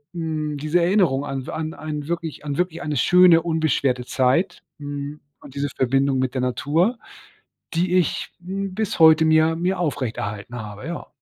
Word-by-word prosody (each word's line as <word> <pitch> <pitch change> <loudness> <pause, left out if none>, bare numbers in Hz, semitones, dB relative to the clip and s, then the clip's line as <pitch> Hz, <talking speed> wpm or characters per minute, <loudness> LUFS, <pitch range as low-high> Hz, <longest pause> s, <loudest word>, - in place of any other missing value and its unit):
äh, - - -6
mm, 155 -2 -3
diese 155 +4 +1
Erinnerung 170 -7 +2
an 135 0 -5
w - - -5
an 160 -1 -4
ein 150 -1 -6
wirklich 165 -3 -4
an 145 -1 -3
wirklich 180 -2 -1
eine 150 -1 -2
schöne, 175 +3 +6
unbeschwerte 155 -6 0
Zeit, 140 +10 +1 0.2
hm, 145 0 -6 0.2
und 135 - -14
diese 140 0 -1
Verbindung 135 +1 +2
mit 130 -1 -1
der 130 - -1
Natur, 155 - +1 0.8
die 175 +2 +1
ich, 175 -5 0
hm, 195 0 -4
bis 220 -3 -2
heute 160 0 +7
mir 160 +1 +4
mir 180 +3 -1
aufrechterhalten 120 -8 -3
habe, 105 -1 -8
ja. 170 - -6
155 Hz, 170 wpm, -22 LUFS, 135-170 Hz, 0.8 s, heute